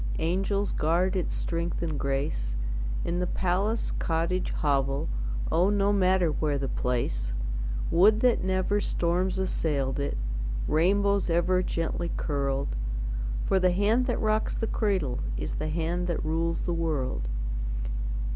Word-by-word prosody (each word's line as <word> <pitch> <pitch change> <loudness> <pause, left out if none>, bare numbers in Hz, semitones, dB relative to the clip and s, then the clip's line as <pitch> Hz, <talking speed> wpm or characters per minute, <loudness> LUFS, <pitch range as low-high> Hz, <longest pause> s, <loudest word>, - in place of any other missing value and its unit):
Angels 195 +4 0
guard 175 +5 +1
its 185 - -1
strength 170 0 -2
and 155 -4 -2
grace, 135 - -1 0.5
In 175 +1 -1
the 180 - 0
palace, 195 +6 0
cottage, 170 +3 0
hovel, 135 - 0 0.4
Oh, 180 +4 +4
no 205 0 +3
matter 185 -3 +3
where 150 -1 0
the 135 -1 -2
place; - - -1 0.6
Would 210 +6 +5
that 250 -6 +3
never 190 +2 +1
storms 180 +2 0
assailed 145 -8 0
it, 140 - -1 0.5
Rainbows 200 +5 +3
ever 175 +2 +3
gently 170 -1 -2
curled; 140 - -1 0.7
For 190 - +3
the 185 0 +4
hand 215 +7 +2
that 245 - 0
rocks 215 0 +1
the - - -1
cradle 190 - 0 0.2
Is - - -3
the 155 +1 -2
hand 170 +3 -1
that 170 -3 -1
rules 165 +1 0
the 175 - -1
world. 145 - -1
170 Hz, 135 wpm, -28 LUFS, 150-190 Hz, 0.7 s, Would